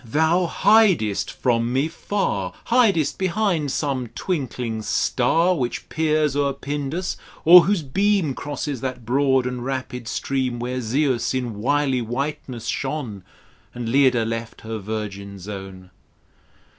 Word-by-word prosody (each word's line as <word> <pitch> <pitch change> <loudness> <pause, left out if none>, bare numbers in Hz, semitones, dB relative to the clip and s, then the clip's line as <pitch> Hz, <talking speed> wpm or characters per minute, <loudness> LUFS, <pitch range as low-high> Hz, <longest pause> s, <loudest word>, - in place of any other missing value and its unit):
thou 160 +8 +2
hidest 190 - +3
from 120 -2 0
me 135 +4 +1
far, 165 - -2 0.2
Hidest 220 - +3
behind 185 -6 0
some 135 -4 -1
twinkling 125 - -3
star 170 +10 +2
Which 125 -6 -3
peers 155 -2 +1
o'er 140 -1 +1
Pindus, 145 +6 -3 0.3
or 175 +1 +10
wliose 165 -9 -1
beam 195 -7 +2
Crosses 145 -2 -4
that 130 -3 -4
broad 130 +1 +2
and 125 -1 -3
rapid 130 -2 -4
stream 130 0 -1
Where 125 +2 -3
Zeus 130 +1 0
in 125 -3 -2
wily 135 +1 +1
whiteness 125 0 -4
shone 130 -9 -3 0.5
And 120 -2 -4
Leda 130 -3 +4
left 115 0 -5
her 110 0 -5
virgin 100 -1 -5
zone. 95 -1 -9
130 Hz, 125 wpm, -22 LUFS, 115-155 Hz, 0.5 s, or